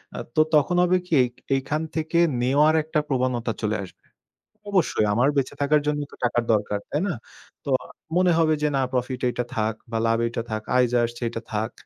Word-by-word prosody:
আ - - -5 0.2
তো 155 - +5
তখন 150 +4 +3
হবে 180 +1 +3
কি, 180 - -5
এই, - - +1 0.3
এইখান 145 +3 -1
থেকে 160 +1 0 0.2
নেওয়ার 145 +5 +4
একটা 155 0 -1
প্রবণতা 125 -3 0
চলে 105 0 +1
আসবে। - - -18 0.7
অবশ্যই 175 - +2
আমার 125 +6 +3
বেঁচে 135 - 0
থাকার 150 +1 +3
জন্য 150 0 +1
তো - - -12
টাকার 120 0 +1
দরকার, 105 -1 0
তাই 150 - -1
না? 180 - -1 0.5
তো - - -4
আ - - -13 0.3
মনে 180 -1 +4
হবে 160 -1 +3
যে, - - +4
না, - - +2
প্রফিট 125 0 -2
এইটা 125 - -2
থাক 110 0 0 0.2
বা 115 - -1
লাভটা 115 +1 0
থাক। 110 0 -3
আয় 125 -1 +4 0.2
আসছে 120 +1 -8
এটা 115 0 -6
থাক। 110 +2 -1
130 Hz, 195 wpm, -24 LUFS, 115-155 Hz, 0.7 s, তো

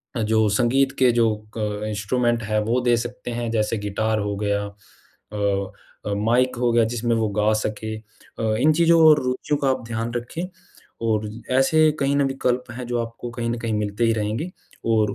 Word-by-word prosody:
अ, 120 - -1
जो 110 0 +2
संगीत 125 +6 +2
के 125 -2 +5
जो 115 -1 +3 0.3
क 105 -1 -2
इंस्ट्रूमेंट 120 +3 0
है, 110 0 0
वो 115 +4 +1
दे 120 -1 +3
सकते 120 +1 -5
हैं, 120 -1 -3
जैसे 110 0 0
गिटार 110 +2 -1
हो 100 0 -2
गया, 100 0 0
अ 100 - -8 1.3
अ, 105 - -1
माइक 120 +5 +2
हो 120 -1 +2
गया 115 0 +4
जिसमें 120 0 0
वो 110 -1 +1
गा 105 +1 +3
सके, 110 0 -4
अ, 110 0 -5
इन 155 +1 +4
चीज़ों 170 +1 +4
और 150 -1 +5
रुचियों 130 +3 -1
का 135 - +1
आप 130 -1 -1
ध्यान 115 +1 -3
रखें। 120 +8 -4 0.6
और 110 -1 +1 0.2
ऐसे 155 +4 +4
कहीं 140 +1 +1
न - - +2
कहीं 140 - +3
विकल्प 125 -2 0
हैं 125 +1 -6
जो 120 - -1
आपको 115 +1 -6
कहीं 115 -1 -2
न 120 - -1
कहीं 115 -1 -2
मिलते 105 +1 -1
ही 115 - +3
रहेंगे 110 +10 -2 0.4
और 110 -3 +2
115 Hz, 200 wpm, -23 LUFS, 110-125 Hz, 1.3 s, के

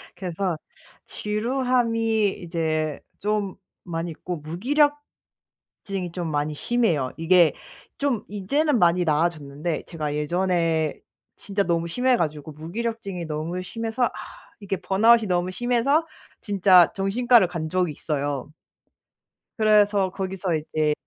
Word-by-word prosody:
그래서 180 -2 -2 0.5
지루함이 225 -2 0
이제 160 -3 -1 0.2
좀 205 -2 -1 0.3
많이 170 -1 -4
있고 175 +2 -5
무기력증이 200 - -3
좀 175 -2 -3
많이 150 +1 -1
심해요. 165 - 0
이게 170 0 +5 0.4
좀 275 -6 0
이제는 250 +8 0
많이 175 0 +4
나아졌는데 155 0 -1
제가 150 -4 -3
예전에 165 0 0 0.4
진짜 200 0 -1
너무 170 -2 0
심해 250 +7 +2
가지고 155 -3 -3
무기력증이 195 +3 -4
너무 160 +3 -3
심해서 225 +5 -3
아 - - 0 0.5
이게 195 -2 -3
번아웃이 220 +5 +4
너무 180 0 0
심해서 245 - +1 0.4
진짜 190 -4 +5
정신과를 220 +2 +3
간 170 -2 -4
적이 180 -1 +1
있어요. 145 -2 -3 1.1
그래서 210 -3 +4
거기서 190 -2 -2
이제 155 0 0
185 Hz, 270 characters per minute, -24 LUFS, 160-220 Hz, 1.1 s, 이게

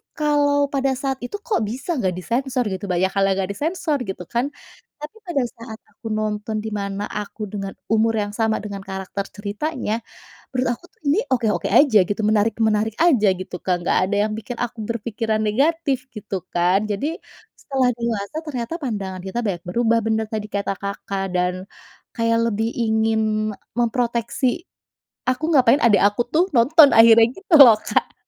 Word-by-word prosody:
kalau 285 -1 +2
pada 270 -1 0
saat 270 0 -3
itu 245 +11 -6
kok 430 - 0
bisa 265 - -3
nggak 185 -5 0
disensor 250 +7 -1
gitu, 190 +1 -4
banyak 185 +1 +1
hal 195 0 +1
yang 195 - +1
nggak 190 - -3
disensor 315 - -1
gitu 190 -2 -5
kan. 240 - -1 0.5
Tapi 300 +8 -10
pada 285 -7 0
saat 230 -1 -9 0.2
aku 225 - -10
nonton 215 0 -2
di 220 - -5
mana 200 0 -3
aku 210 +1 -5
dengan 195 -2 -5 0.2
umur 225 0 +3
yang 205 -1 -1
sama, 220 0 0
dengan 200 -2 -6
karakter 195 +1 -5
ceritanya, 220 +3 -3 0.5
menurut 255 -1 -1
aku 350 - -28
tuh - - -37
ini 295 +7 +3
oke-oke 230 -4 +1
aja 260 -8 +6
gitu, 205 +4 -3
menarik-menarik 220 0 +1
aja 270 -12 +4
gitu 185 -1 -6
Kak, 175 -2 -1
nggak - - +3
ada 205 - 0
yang 215 - -4
bikin 225 +2 -7
aku 240 -1 -3
berpikiran 225 0 -2
negatif 270 +5 +1
gitu 200 -4 -5
kan. 180 +4 +2
Jadi 285 +11 -2 0.4
setelah 265 -3 0
dewasa 230 +1 -3
ternyata 265 0 -4
pandangan 195 -7 -4
kita 190 +5 -4
banyak 175 -3 -2
berubah, 230 +5 +1
bener 220 0 0
tadi 215 -1 -4
kata 200 -1 -1
Kakak 200 0 -4
dan 180 0 +1 0.6
kayak 230 -1 +1
lebih 220 +2 -1
ingin 220 -1 +1 0.6
memproteksi. 240 +4 0 0.6
Aku 255 +4 0
ga 280 - +6
pengen 270 +5 +5
adik 205 -5 +5
aku 205 +4 -1
tuh 325 +3 +4
nonton 280 +5 +7
akhirnya 225 0 +8
gitu 385 -3 +1
loh 240 -5 +10
Kak. - - -1
225 Hz, 170 wpm, -21 LUFS, 205-260 Hz, 0.6 s, loh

